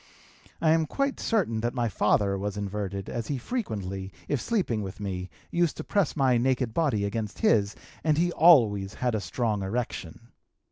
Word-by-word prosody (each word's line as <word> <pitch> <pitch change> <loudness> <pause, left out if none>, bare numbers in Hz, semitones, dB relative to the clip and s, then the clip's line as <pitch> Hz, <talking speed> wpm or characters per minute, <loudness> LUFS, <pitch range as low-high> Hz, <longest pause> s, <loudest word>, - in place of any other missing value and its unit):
I 160 - +4
am 160 -1 +3
quite 275 - -1
certain 180 - 0
that 120 +2 -2
my 120 -2 +1
father 105 -2 +2
was 100 +1 -3
inverted, 100 -1 -4
as 115 -2 -4
he 140 - -1
frequently, 100 - -4 0.2
if 145 -5 0
sleeping 150 - 0
with 95 0 -7
me, 95 -3 -4 0.2
used 170 -2 +1
to - - -4
press 200 -6 0
my 130 -5 +3
naked 125 -2 +1
body 130 -11 +1
against 105 0 -3
his 100 -1 +3 0.3
and 155 -2 +2
he 175 +2 +2
always 110 - +5
had 125 -2 -1
a 110 - -1
strong 110 -2 -1
erection. 115 0 -4
115 Hz, 175 wpm, -27 LUFS, 100-150 Hz, 0.3 s, always